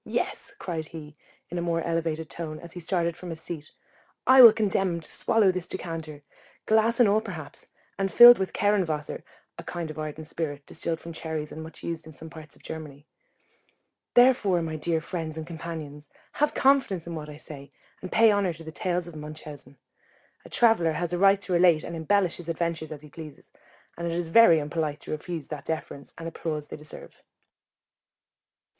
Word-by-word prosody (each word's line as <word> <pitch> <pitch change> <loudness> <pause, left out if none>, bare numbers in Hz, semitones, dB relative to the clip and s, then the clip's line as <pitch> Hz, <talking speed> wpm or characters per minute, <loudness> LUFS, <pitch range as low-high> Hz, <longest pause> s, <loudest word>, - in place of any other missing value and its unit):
Yes, - - -3
cried 160 -4 -4
he, 155 -2 -10 0.4
in 175 - -2
a - - -1
more 170 -1 -1
elevated 165 -1 -2
tone, 155 -2 -6
as 170 - -11
he 180 - -7
started 170 -1 -1
from 180 - -9
his 165 -1 -5
seat, 160 -2 -7 0.6
I 260 0 +8
will 235 -3 +12
condemn 195 -4 +1
him - - -4
to - - -7
swallow 215 -4 +3
this 185 -1 -4
decanter, 160 -5 -6 0.4
glass 220 +2 +3
and 240 - +7
all 210 +2 +3
perhaps, 175 -10 -8 0.3
and 195 -1 0
filled 240 -1 +10
with 190 - -1
kerren 205 -1 +2
wasser 155 -3 -4 0.4
[a - - -7
kind 170 -3 -5
of 155 - -9
ardent 155 0 -5
spirit 145 -3 -4
distilled 165 0 -4
from 170 - -9
cherries, 160 -2 -4
and 160 - -7
much 160 +1 -10
used 165 -1 -5
in 160 - -11
some 160 +3 -10
parts 160 -3 -11
of - - -23
Germany]. 150 -3 -8 1.1
Therefore, 225 -8 +5
my 160 -1 -4
dear 160 +1 -1
friends 160 -3 -5
and 160 - -5
companions, 160 -3 -7 0.2
have 295 +1 0
confidence 265 - +3
in 170 - -6
what 155 -2 -6
I 150 - -9
say, 140 -2 -10 0.3
and 185 - -7
pay 225 -1 +6
honour 200 -4 +1
to 165 0 -12
the 160 - -8
tales 175 +1 -1
of 170 -2 -9
Munchausen. 150 -2 -9 0.7
A - - -13
traveller 225 -9 +4
has 175 +1 -2
a 175 - 0
right 195 +1 +5
to 190 - -2
relate 170 -3 +5
and 170 - -6
embellish 175 +3 +1
his 170 -1 -9
adventures 165 -1 -2
as 150 -1 -8
he 150 - -12
pleases, 155 -2 -11 0.4
and 170 0 -4
it 165 - -2
is 170 -1 -2
very 230 -4 +7
unpolite 150 0 -2
to - - -8
refuse 155 -1 -5
that 150 -2 -6
deference 155 -3 -5
and 165 - -6
applause 155 -2 -4
they - - -6
deserve. 150 0 -10
165 Hz, 195 wpm, -26 LUFS, 155-185 Hz, 1.1 s, will